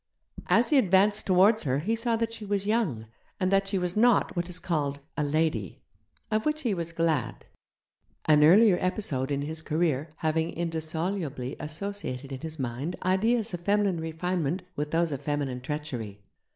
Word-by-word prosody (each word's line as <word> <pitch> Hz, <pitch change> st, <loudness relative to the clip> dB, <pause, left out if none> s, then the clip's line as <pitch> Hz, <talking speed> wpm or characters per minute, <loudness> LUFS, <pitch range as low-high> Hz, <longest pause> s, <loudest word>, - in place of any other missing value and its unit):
As 235 Hz, +4 st, +3 dB
he 290 Hz, -, +6 dB
advanced 205 Hz, 0 st, +3 dB
towards 195 Hz, +4 st, +5 dB
her 130 Hz, -2 st, 0 dB
he 200 Hz, +11 st, 0 dB
saw 230 Hz, 0 st, 0 dB
that 230 Hz, 0 st, -1 dB
she 225 Hz, -, -7 dB
was 200 Hz, -1 st, -1 dB
young, 205 Hz, -, 0 dB, 0.3 s
and 185 Hz, 0 st, +1 dB
that 195 Hz, 0 st, +3 dB
she 195 Hz, 0 st, 0 dB
was 180 Hz, -1 st, -1 dB
not 235 Hz, -1 st, +3 dB
what 175 Hz, 0 st, -2 dB
is 180 Hz, -, -3 dB
called 145 Hz, -6 st, -2 dB, 0.2 s
'a 150 Hz, -, 0 dB
lady' 145 Hz, -, -1 dB, 0.5 s
of 215 Hz, 0 st, +1 dB
which 305 Hz, 0 st, 0 dB
he 235 Hz, -5 st, +1 dB
was 170 Hz, -2 st, -3 dB
glad: 160 Hz, -8 st, -1 dB, 0.8 s
an 150 Hz, -1 st, +5 dB
earlier 190 Hz, +4 st, +6 dB
episode 155 Hz, -8 st, -1 dB
in 140 Hz, 0 st, -1 dB
his 160 Hz, +2 st, -5 dB
career 155 Hz, -2 st, 0 dB
having 160 Hz, +1 st, -1 dB
indissolubly 160 Hz, -4 st, -3 dB
associated 155 Hz, -5 st, -5 dB
in 135 Hz, -, -5 dB
his 160 Hz, +1 st, -6 dB
mind 135 Hz, +6 st, -3 dB
ideas 220 Hz, +4 st, +1 dB
of 175 Hz, -, -3 dB
feminine 200 Hz, -1 st, +1 dB
refinement 165 Hz, +1 st, -2 dB
with 150 Hz, +1 st, -2 dB
those 165 Hz, +1 st, +1 dB
of 140 Hz, -2 st, -4 dB
feminine 140 Hz, -3 st, -2 dB
treachery. 125 Hz, -8 st, -5 dB
170 Hz, 170 wpm, -27 LUFS, 150-200 Hz, 0.8 s, he